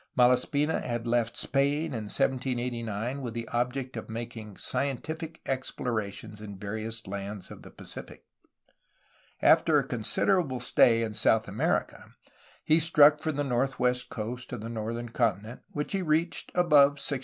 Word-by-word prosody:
Malaspina 125 +5 +3
had 120 -1 -3
left 115 -1 0
Spain 145 +3 +1
in 110 -3 -4
1789 125 -2 -1
with 120 -3 -5
the 115 -1 -4
object 125 +2 -2
of 110 - -6
making 110 -3 -7
scientific 160 +4 -3
explora 120 -5 -2
tions 105 +1 -10
in 100 -2 -8
various 110 +3 -5
lands 100 0 -6
of - - -10
the - - -12
Pacific. - - -9 1.2
After - - +5
a - - +3
considerable 130 - +1
stay 115 -1 +4
in 110 -1 -3
South 110 +1 +3
America, - - -2 0.5
he 155 +2 +4
struck 150 -2 +6
for 155 - 0
the 145 -1 -1
northwest 125 -1 0
coast 120 +3 -5
of 125 -4 -5
the 115 - -6
northern 115 +1 -4
continent, 115 -1 -1
which 150 0 -3
he 195 - 0
reached 165 0 0
above 150 -5 +5
60°. 140 -1 -2
125 Hz, 145 wpm, -28 LUFS, 115-140 Hz, 1.2 s, struck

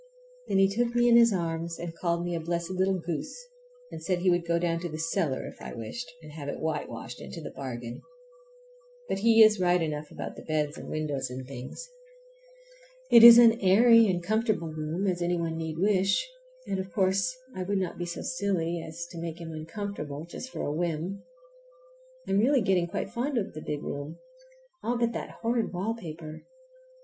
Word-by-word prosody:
Then - - +1
he 195 0 +6
took 235 +4 -1
me 240 0 +4
in 235 - +6
his 235 -1 +7
arms 165 -2 -2
and 170 -1 -6
called 170 0 -1
me 175 - -2
a 170 - -1
blessed 170 +2 -3
little 190 +1 +1
goose, 165 - -4 0.5
and - - -7
said 180 +1 0
he 180 +1 +2
would 175 -1 0
go 170 0 +2
down 170 -1 0 0.2
cellar 165 -4 -1
if - - -10
I - - -7
wished, 140 - -6
and 155 - -11
have 145 -2 -6
it - - -5
whitewashed 125 -7 -4
into - - -8
the 155 - -7
bargain. 120 -3 -6 1.1
But - - -1
he 225 +1 +7
is 215 -1 +5
right 180 0 +3
enough 155 -2 -3
about - - -7
the - - -10
beds 150 -1 -1
and - - -9
windows 145 -4 -2
and 130 +1 -6
things. 130 - -8 1.2
It 235 - +9
is 235 0 +12
as 235 -1 +9
airy 230 +4 +6
and 175 -2 0
comfortable 215 -3 0
a - - -10
room 155 +5 -2
as 180 -2 0
any 175 0 +1
one 165 -1 -2
need 160 -1 -4
wish, 195 - +2 0.4
and, 195 - -2
of 190 -1 -5
course, 195 +7 +1 0.2
I 185 - -4
would 200 +2 -1
not 185 -2 -3
be 175 - -3
so 170 - -5
silly 175 -8 -1
as 160 +2 -7
to 170 - -7
make 165 0 -5
him 165 -1 -7
uncomfortable 160 -2 -6
just 210 +9 -8
for - - -5
a 145 - -2
whim. 170 +3 -2 1.1
I'm 195 - +2
really 260 +4 +4
getting 185 -4 +2
quite 195 +2 -4
fond 250 +3 -2
of 205 - -2
the 155 - -7
big 150 -1 -4
room, 145 +3 -5 0.6
all 240 +1 -1
but 235 -1 +1
that - - -6
horrid 230 0 0 0.3
paper. 160 -3 -8
175 Hz, 195 wpm, -28 LUFS, 160-200 Hz, 1.2 s, is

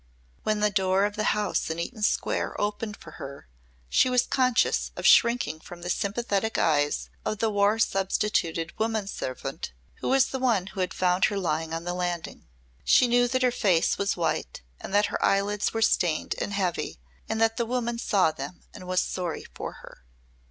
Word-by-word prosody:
When 215 -1 0
the 210 0 +3
door 190 0 +2
of 205 0 -3
the 215 - -1
house 210 -5 -1
in 160 - -3
Eaton 215 +7 -5
Square 210 - 0
opened 210 +1 -2
for - - -12
her 140 - -8 0.4
she 255 - +3
was 250 -1 +3
conscious 255 -3 +2
of - - -5
shrinking 235 -9 +4
from 175 +1 -11
the 175 - -1
sympathetic 215 +1 -1
eyes 145 -2 +1
of 215 - -2
the 225 +1 0
war 205 +1 +3
substituted 190 -5 0
woman 220 -2 0
servant 135 - -5 0.3
who - - -2
was 265 0 +4
the 265 - -3
one 230 -8 +2
who 190 0 -9
had 185 - -1
found 180 0 +3
her 205 - -1
lying 160 -3 -1
on 165 +1 -3
the 175 0 -3
landing. 175 -2 -4 0.4
She 250 - +5
knew 245 0 +4
that 255 +1 0
her 250 - +4
face 190 -8 +2
was 200 -1 0
white 165 - -2 0.2
and - - -8
that 205 +1 +4
her - - -1
eyelids 200 +1 +1
were 225 0 0
stained 170 -7 +1
and - - -2
heavy 185 - -2 0.3
and 220 - -1
that 225 +1 +2
the 235 - 0
woman 240 -1 -1
saw 190 -8 +2
them 140 +3 -8
and 185 - -10
was 185 0 +2
sorry 180 -3 -3
for - - -5
her. - - -15
200 Hz, 190 wpm, -27 LUFS, 175-225 Hz, 0.4 s, She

